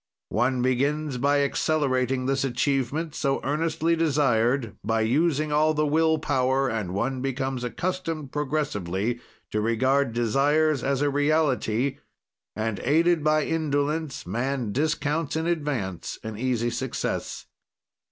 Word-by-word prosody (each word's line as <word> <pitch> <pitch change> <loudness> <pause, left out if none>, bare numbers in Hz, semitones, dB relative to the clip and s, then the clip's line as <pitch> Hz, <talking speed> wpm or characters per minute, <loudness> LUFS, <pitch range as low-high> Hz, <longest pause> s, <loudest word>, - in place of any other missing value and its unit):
"One 125 0 +1
begins 140 +2 0
by 140 +2 +3
accelerating 135 -3 0
this 135 0 +1
achievement, 135 +4 -1
so 135 -3 0
earnestly 160 +3 0
desired, 135 -7 +1
by 110 +2 +1
using 150 +6 +1
all 155 +1 +3
the 150 0 +2
will 160 +2 +3
power, 135 -2 +1
and 105 -5 -3
one 130 +5 -1
becomes 135 -1 -2
accustomed 165 +1 -3
progressively 120 - -2 0.3
to 105 - 0
regard 130 +4 +2
desires 140 +5 +2
as 140 +1 +1
a 145 - +2
reality, 140 -4 +1 0.6
and, 110 -1 -2
aided 165 +3 +2
by 155 0 +3
indolence, 150 -2 -1
man 120 +3 -2
discounts 150 +2 -1
in 160 0 -1
advance 145 - -2
an 110 -1 -5
easy 120 0 0
success. 130 0 -3
135 Hz, 125 wpm, -25 LUFS, 125-155 Hz, 0.6 s, by